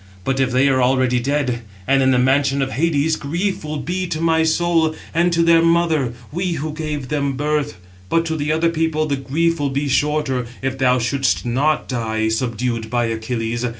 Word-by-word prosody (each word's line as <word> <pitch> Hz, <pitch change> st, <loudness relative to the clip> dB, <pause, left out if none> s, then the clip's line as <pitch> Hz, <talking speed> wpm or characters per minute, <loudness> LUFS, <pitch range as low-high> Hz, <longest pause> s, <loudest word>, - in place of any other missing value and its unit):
But 135 Hz, +5 st, -1 dB
if 135 Hz, -1 st, +2 dB
they 130 Hz, +2 st, +3 dB
are 130 Hz, -2 st, +2 dB
already 125 Hz, -1 st, +2 dB
dead, 130 Hz, -2 st, -1 dB, 0.2 s
and 135 Hz, 0 st, +3 dB
in 130 Hz, -, +3 dB
the 130 Hz, -, +3 dB
mansions 135 Hz, +2 st, +2 dB
of 135 Hz, -, -4 dB
Hades, 155 Hz, +1 st, +1 dB
grief 170 Hz, +8 st, -2 dB
will 155 Hz, 0 st, -4 dB
be 180 Hz, +7 st, -3 dB
to 155 Hz, -, -3 dB
my 165 Hz, 0 st, +2 dB
soul, 160 Hz, 0 st, +2 dB, 0.2 s
and 175 Hz, +2 st, +2 dB
to 170 Hz, 0 st, +2 dB
their 165 Hz, 0 st, +5 dB
mother, 165 Hz, -6 st, +2 dB, 0.2 s
we 175 Hz, +2 st, -1 dB
who 155 Hz, 0 st, -4 dB
gave 150 Hz, -4 st, -4 dB
them 140 Hz, -2 st, -1 dB
birth. 145 Hz, -2 st, -1 dB, 0.3 s
But 165 Hz, 0 st, +2 dB
to 160 Hz, -1 st, -2 dB
the 150 Hz, 0 st, -1 dB
other 165 Hz, +2 st, +2 dB
people 160 Hz, -1 st, 0 dB
the 145 Hz, -2 st, -1 dB
grief 165 Hz, +5 st, 0 dB
will 145 Hz, -1 st, 0 dB
be 140 Hz, +2 st, -2 dB
shorter, 135 Hz, -2 st, 0 dB, 0.2 s
if 135 Hz, 0 st, -2 dB
thou 125 Hz, -1 st, +3 dB
shouldst 130 Hz, +2 st, 0 dB
not 140 Hz, +6 st, 0 dB
die, 110 Hz, -3 st, -1 dB
subdued 115 Hz, 0 st, -2 dB
by 120 Hz, 0 st, +1 dB
Achilles. 115 Hz, +1 st, -3 dB
140 Hz, 195 wpm, -20 LUFS, 130-160 Hz, 0.3 s, their